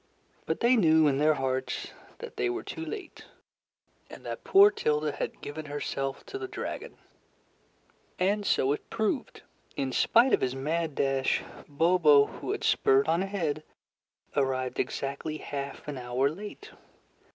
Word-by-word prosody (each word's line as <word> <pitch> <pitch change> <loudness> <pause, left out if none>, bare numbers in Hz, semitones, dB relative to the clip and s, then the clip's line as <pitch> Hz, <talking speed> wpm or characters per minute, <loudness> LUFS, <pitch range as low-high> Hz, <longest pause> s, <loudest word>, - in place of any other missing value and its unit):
But - - -2
they 245 +2 +5
knew 160 -7 +5
in 135 -1 +1
their 155 +1 +4
hearts 130 -1 -2 0.3
that 475 -1 -9
they 380 - 0
were 365 0 -3
too 325 - -6
late, 395 +4 -7 0.8
and - - -12
that - - -5
poor 400 +1 +7
Tilda 150 - 0
had - - -5
given 155 +2 -6
herself 135 -1 -4
to 400 - -6
the 385 - -4
dragon. - - -6 1.2
And 200 +3 +1
so 140 -8 +2
it - - -7
proved. 225 +4 -2 0.3
In 135 -1 -2
spite 235 - +4
of - - +4
his 130 0 0
mad 155 +2 -2
dash, 135 -1 +1 0.2
Bobo, 150 -1 +5
who - - -8
had 420 - -3
spurred 415 -1 +3
on 170 - +2
ahead, 180 -6 -2 0.7
arrived 130 -2 0
exactly 140 +3 -3
half 140 -1 -6
an 145 -3 -4
hour 125 +3 0
late. 210 - -9
155 Hz, 150 wpm, -28 LUFS, 140-215 Hz, 1.2 s, poor